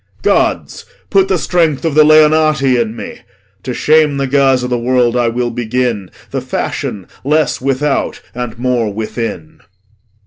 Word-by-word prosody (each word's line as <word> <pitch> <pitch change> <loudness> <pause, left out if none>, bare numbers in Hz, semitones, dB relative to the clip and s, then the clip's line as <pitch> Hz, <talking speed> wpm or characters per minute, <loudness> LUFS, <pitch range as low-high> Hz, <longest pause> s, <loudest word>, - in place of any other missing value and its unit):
Gods, - - 0 0.3
put 195 -2 +3
the 190 -1 +1
strength 165 -3 0
o' 160 - 0
th' 155 +1 +6
Leonati 155 -3 +4
in 115 -1 -3
me! - - -8 0.4
To 125 - -5
shame 150 +2 +2
the 135 - 0
guise 135 -1 +2
o' - - -1
th' 120 -1 -2
world, 125 -1 +1
I 120 -1 +2
will 120 +1 -1
begin 115 -4 -2 0.2
The - - -2
fashion 95 -3 -4 0.2
less 150 +1 +1
without 135 +2 -1
and 120 -2 -5
more 120 -3 0
within. 110 -5 -5
130 Hz, 150 wpm, -14 LUFS, 120-150 Hz, 0.4 s, th